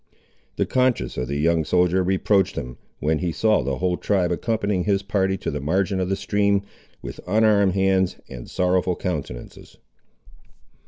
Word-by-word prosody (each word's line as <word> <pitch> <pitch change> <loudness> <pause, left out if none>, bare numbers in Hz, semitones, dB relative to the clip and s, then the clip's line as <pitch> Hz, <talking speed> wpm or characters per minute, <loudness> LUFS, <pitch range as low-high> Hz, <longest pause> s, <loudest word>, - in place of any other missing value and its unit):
The - - 0
conscience 125 - 0
of 65 - -3
the 70 +2 -2
young 80 +2 +2
soldier 90 +3 +2
reproached 95 +1 +1
him, 60 -1 -6 0.2
when 75 +1 0
he 90 -2 -1
saw 110 +5 +2
the 70 -1 -2
whole 90 -1 0
tribe 95 -4 0
accompanying 100 -1 -1
his 100 -2 +1
party 95 -1 0
to - - -4
the 75 -1 -4
margin 95 +6 0
of 90 0 -1
the 95 - +1
stream, 100 -1 +1 0.4
with - - -7
unarmed 105 -1 +3
hands 95 -1 +2
and - - -9
sorrowful 90 0 +1
countenances. 75 -10 -6
95 Hz, 160 wpm, -23 LUFS, 85-100 Hz, 0.4 s, unarmed